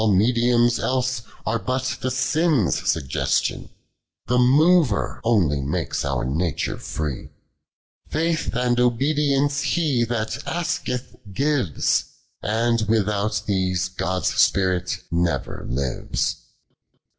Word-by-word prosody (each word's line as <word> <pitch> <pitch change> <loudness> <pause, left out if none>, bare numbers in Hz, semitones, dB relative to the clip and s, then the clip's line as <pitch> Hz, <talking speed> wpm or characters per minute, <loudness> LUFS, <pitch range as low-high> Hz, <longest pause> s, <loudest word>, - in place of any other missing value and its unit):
mediums 120 +4 +3
idsc 130 -1 0 0.2
are 115 +1 0
but 130 0 -2
tho 130 - -1
sin's 145 - +1
suggestion, 70 -3 0 0.6
Tlie 125 +2 +3
mover 145 - +3
onely 90 -12 +2
makes 70 +2 -2
our 65 -3 -1
nature 80 +4 -1
iiec; 75 -3 -5 0.8
Faith 160 -4 -1
and 125 0 +1
obedience 140 +3 +2
He 145 -5 +1
that 110 -2 -3
askctb 130 - -4
gives; 140 - +1 0.4
And 115 +2 +1
without 105 -1 +1
these 95 -2 0
Ood's 95 0 0
Spirit 90 -2 +1
never 85 0 -1
lives. 65 +1 -2
115 Hz, 100 wpm, -23 LUFS, 95-130 Hz, 0.8 s, mediums